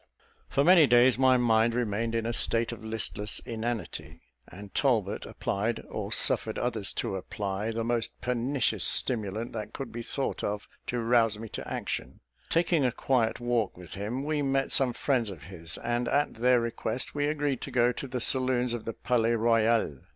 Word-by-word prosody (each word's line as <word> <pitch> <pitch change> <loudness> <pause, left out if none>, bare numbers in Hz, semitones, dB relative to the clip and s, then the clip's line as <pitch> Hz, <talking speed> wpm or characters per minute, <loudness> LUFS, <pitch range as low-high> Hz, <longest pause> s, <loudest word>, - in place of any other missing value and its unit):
For 140 - +2
many 170 -2 +7
days 125 +1 +5
my 130 -1 +5
mind 115 -1 +3
remained 115 -1 -1
in 115 -1 0
a 115 - -1
state, 115 0 +1
of 115 -2 -8
listless 110 -1 -3
inanity; 110 -8 -5 0.3
and 100 +3 -11
Talbot 110 -8 +1
applied, 110 +4 -2
or - - -5
suffered - - +2
others 115 -5 -1
to - - -2
apply, 100 +2 -3
the 115 0 -2
most 115 0 -1
pernicious 125 +2 0
stimulant 110 -1 0
that 110 -1 -6
could 135 -3 -6
be 120 - -5
thought 135 +3 -2
of 105 0 -3 0.2
to 125 - -1
rouse 115 -2 +3
me 110 0 -8
to - - -7
action. - - -4 0.3
Taking 165 -2 +2
a 125 - +2
quiet 120 -2 0
walk 120 -5 -1
with 90 -2 -10
him, 110 +7 -3
we 150 0 -1
met 135 -1 0
some 130 -3 +4
friends 125 -6 0
of 85 -8 -9
his; 85 -2 -5
and, 120 0 -1
at 145 +3 +1
their 125 +1 +3
request, 115 +1 -3
we 145 0 0
agreed 145 -4 -1
to - - -5
go 120 -1 +3
to 135 - -6
the 125 0 -3
saloons 125 -1 +2
of 120 - -5
the 115 - -3
Palais 115 -1 +1
Royal. 115 - +2
115 Hz, 180 wpm, -28 LUFS, 110-125 Hz, 0.3 s, many